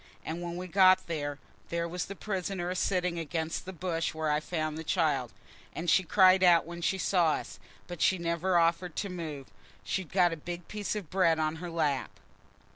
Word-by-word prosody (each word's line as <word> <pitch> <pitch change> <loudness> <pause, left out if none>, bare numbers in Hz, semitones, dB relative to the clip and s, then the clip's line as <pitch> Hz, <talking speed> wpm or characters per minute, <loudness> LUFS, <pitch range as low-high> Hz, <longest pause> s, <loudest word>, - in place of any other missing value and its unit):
And 165 +2 -4
when 175 0 -5
we 180 - -5
got 185 +1 +5
there, 145 -4 -3 0.3
there 170 0 -1
was 175 0 -3
the 200 - -7
prisoner 185 -3 -3
a - - -3
sitting 180 -2 0
against 160 0 -3
the 190 - -6
bush 170 -2 -2
where 155 -1 0
I 150 - +2
found 155 -1 -3
the 160 - -5
child; 150 - 0 0.4
and 170 +1 0
she - - +5
cried 185 +1 +5
out 175 -2 +6
when 170 +1 -8
she 190 +3 +1
saw 175 -4 +2
us, - - -6 0.3
but 175 -2 -8
she 190 - +4
never 170 +1 0
offered 170 0 +1
to 200 - -2
move. 155 -7 -6 0.3
She'd 190 -5 -3
got 180 -3 +3
a - - -5
big 175 +2 -7
piece 210 0 -3
of 200 -7 -6
bread 180 -4 +3
on 155 0 -1
her 175 +2 -6
lap." 150 -5 -1
170 Hz, 200 wpm, -30 LUFS, 160-185 Hz, 0.4 s, out